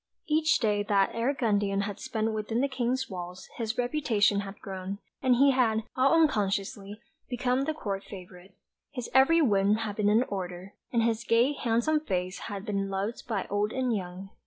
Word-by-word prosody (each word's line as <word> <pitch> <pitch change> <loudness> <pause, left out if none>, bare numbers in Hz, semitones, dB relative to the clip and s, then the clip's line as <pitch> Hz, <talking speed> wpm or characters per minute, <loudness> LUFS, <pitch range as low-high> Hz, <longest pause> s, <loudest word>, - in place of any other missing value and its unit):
Each 315 0 +3
day 210 -3 +1
that 195 -2 +3
Eric 250 +5 -1
Gundian 205 -3 +1
had 200 0 -5
spent 220 0 -2
within 215 +2 -2
the 280 - +2
King's 260 0 -1
walls 180 -1 -7
his 230 -1 -3
reputation 245 -6 +2
had 200 0 -7
grown, 190 0 -6 0.2
and 255 -2 +4
he 275 +3 +5
had, 225 -4 +2
all 275 +5 +4
unconsciously, 205 -6 0 0.3
become 250 +2 0
the 315 - -1
Court 200 -8 -4
favourite. 185 0 -12 0.3
His 250 -4 -6
every 310 +6 +5
whim 200 -4 +3
had 220 -2 -4
been 210 -1 +2
an 220 +4 +4
order; 185 -3 -6 0.2
and 235 -2 +2
his 230 0 0
gay 235 +5 +3
handsome 245 +4 +1
face 185 -9 -3
had 200 -1 -5
been 200 -2 -1
loved 195 +6 -3
by 215 -5 -1
old 205 +1 0
and 255 -3 0
young. 185 0 -6
220 Hz, 180 wpm, -28 LUFS, 195-255 Hz, 0.3 s, he